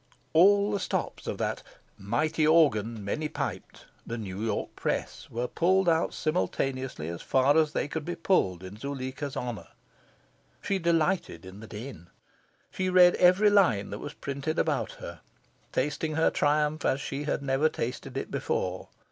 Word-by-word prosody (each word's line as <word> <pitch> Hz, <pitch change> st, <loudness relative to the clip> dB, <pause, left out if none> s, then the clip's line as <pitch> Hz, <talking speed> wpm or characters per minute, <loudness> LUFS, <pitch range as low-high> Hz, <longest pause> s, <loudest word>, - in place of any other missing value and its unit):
All 200 Hz, +5 st, +5 dB
the 200 Hz, -, 0 dB
stops -, -, -3 dB
of -, -, -3 dB
that -, -, -2 dB, 0.3 s
"mighty 150 Hz, +10 st, 0 dB
organ, 115 Hz, -10 st, +3 dB
many 150 Hz, +10 st, -2 dB
piped," 135 Hz, -6 st, -5 dB, 0.2 s
the 115 Hz, -, -5 dB
New 100 Hz, -3 st, -6 dB
York 110 Hz, -2 st, -2 dB
press, -, -, -3 dB
were 120 Hz, +2 st, -2 dB
pulled 190 Hz, +5 st, +2 dB
out 165 Hz, -1 st, +2 dB
simultaneously, 135 Hz, -, -2 dB
as 85 Hz, 0 st, -5 dB
far 135 Hz, +2 st, +3 dB
as 155 Hz, -2 st, +3 dB
they -, -, -1 dB
could 160 Hz, +1 st, -4 dB
be 175 Hz, +3 st, -4 dB
pulled, 95 Hz, -, +1 dB
in 95 Hz, +3 st, -9 dB
Zuleika's 135 Hz, +2 st, -5 dB
honour. 120 Hz, -3 st, -4 dB, 0.9 s
She 195 Hz, -1 st, -1 dB
delighted 170 Hz, -, 0 dB
in 95 Hz, +2 st, -10 dB
the 110 Hz, -, -10 dB
din. 105 Hz, -, -9 dB, 0.6 s
She 185 Hz, 0 st, -1 dB
read 180 Hz, -1 st, +7 dB
every 185 Hz, +4 st, +5 dB
line 125 Hz, -, +3 dB
that 100 Hz, -, -5 dB
was -, -, -7 dB
printed 140 Hz, +3 st, -4 dB
about -, -, 0 dB
her, -, -, -9 dB, 0.5 s
tasting 150 Hz, +3 st, -1 dB
her 160 Hz, -, +3 dB
triumph 150 Hz, +1 st, +1 dB
as 135 Hz, -, +1 dB
she 140 Hz, +1 st, -4 dB
had 145 Hz, -, -1 dB
never 140 Hz, +3 st, +2 dB
tasted 125 Hz, 0 st, -5 dB
it -, -, -4 dB
before. -, -, -2 dB
145 Hz, 160 wpm, -28 LUFS, 115-165 Hz, 0.9 s, read